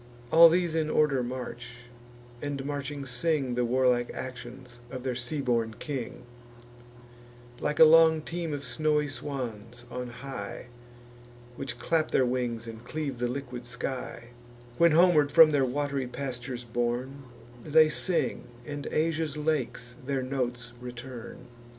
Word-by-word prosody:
All 165 +1 +10
these 175 -1 +1
in 160 -1 0
order 150 -4 +3
march, 125 -1 -6 0.7
and 140 -2 -3
marching 140 0 -4
sing 135 0 0
The 125 0 +1
warlike 125 0 +2
actions 125 -1 -8
of 130 -1 -6
their 130 -1 -1
sea 125 +4 -2
born 115 -4 0
king; 130 -4 -5 1.4
Like 150 - -1
a 160 - +11
long 160 0 +6
team 170 -1 -4
of 145 -1 -4
snowy 150 -1 +1
swans 120 -3 -6
on 125 0 -4
high, 120 -2 -7 0.9
Which 125 -2 -5
clap 155 +6 +1
their 130 - +3
wings, 120 -2 -2
and 115 0 -9
cleave 140 -1 -4
the 120 - +1
liquid 125 -1 -5
sky, 120 -1 -5 0.5
When, 170 -2 +6
homeward 160 -4 +5
from 160 -1 +8
their 140 -3 +3
wat'ry 140 0 -1
pastures 125 -1 -5
borne, 120 +3 -2 0.4
They 155 +1 +6
sing, 165 -4 0 0.2
and 145 +1 -5
Asia's 155 -1 0
lakes 145 -6 -2
their 135 0 -1
notes 125 -2 -3
return. 125 -1 -8
130 Hz, 135 wpm, -28 LUFS, 120-150 Hz, 1.4 s, a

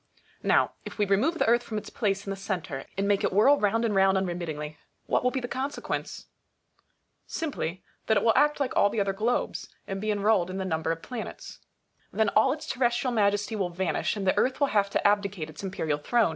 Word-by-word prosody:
Now, - - +3
if - - -9
we 210 - +2
remove 205 - +2
the - - +2
Earth 235 +1 +4
from 220 -2 -5
its 210 - -6
place 200 -2 -1
in 195 - -4
the - - -2
centre, 180 -8 -4
and 200 +1 0
make 200 -1 +2
it - - +1
whirl 245 +9 +5
round 225 +3 +2
and 220 - 0
round 195 0 +4
unremittingly, 165 -5 -3 0.3
what - - +1
will 250 - +4
be 265 - -2
the 245 - -4
consequence? 265 +3 -4 1.0
Simply, 225 - -3 0.2
that 220 - +4
it - - +1
will 225 - +5
act 295 0 +3
like 275 -3 -1
all 205 - +5
the 220 - -2
other 195 -1 +1
globes, 220 +5 -1 0.2
and 195 0 -4
be 215 - -2
enrolled 205 -3 +2
in 185 - -4
the 190 - -2
number 160 -2 -1
of 165 0 -4
the - - -12
planets. 245 -3 -7 0.5
Then 220 -2 +2
all 220 +6 +4
its 300 +2 -4
terrestrial 245 0 0
majesty 205 0 +1
will 190 -4 -1
vanish, 180 +4 -1
and 200 - -3
the 185 - +3
Earth 255 - +1
will 280 -2 +3
have 200 -2 +3
to 200 - +2
abdicate 200 -6 0
its - - -10
imperial 160 -6 -2
throne. 230 +6 +2
205 Hz, 225 wpm, -27 LUFS, 190-235 Hz, 1.0 s, whirl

